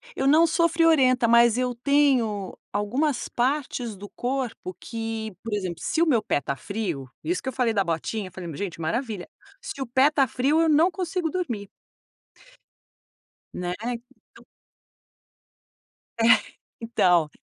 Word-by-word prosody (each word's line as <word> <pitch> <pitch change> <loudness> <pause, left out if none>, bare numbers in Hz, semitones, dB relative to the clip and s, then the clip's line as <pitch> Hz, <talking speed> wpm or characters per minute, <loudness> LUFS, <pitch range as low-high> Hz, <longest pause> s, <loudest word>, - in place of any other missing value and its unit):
eu 270 - 0
não 315 +4 +6
sou 335 +1 +2
friorenta, 295 -7 +4
mas 235 0 +5
eu 250 -1 0
tenho 245 -7 +1 0.2
algumas 250 +8 -1
partes 250 -3 -1
do 205 - -9
corpo 245 -5 -3
que, 225 -2 -5
por 230 - -5
exemplo, 185 -5 -3
se 320 - -1
o 335 - +5
meu 255 -9 +3
pé 205 - 0
tá 140 - -3
frio, 170 - -4
isso 350 +3 -1
que 260 - -3
eu - - -7
falei 235 -2 +1
da 200 - +2
botinha, 185 +4 -3
falei, 170 -3 -7
gente, 180 0 -5
maravilha, 210 - -3 0.3
se 390 -7 -7
o 265 - -3
pé 260 +5 +4
tá 275 -3 +3
frio 275 +7 +2
eu 325 - +3
não 315 +4 +4
consigo 365 -1 -2
dormir. 240 - -3 1.9
Né? 180 0 -3
Então 240 +1 -8 1.8
É, 225 - +4 0.6
então, 180 -8 +3
240 Hz, 145 wpm, -25 LUFS, 205-285 Hz, 1.9 s, não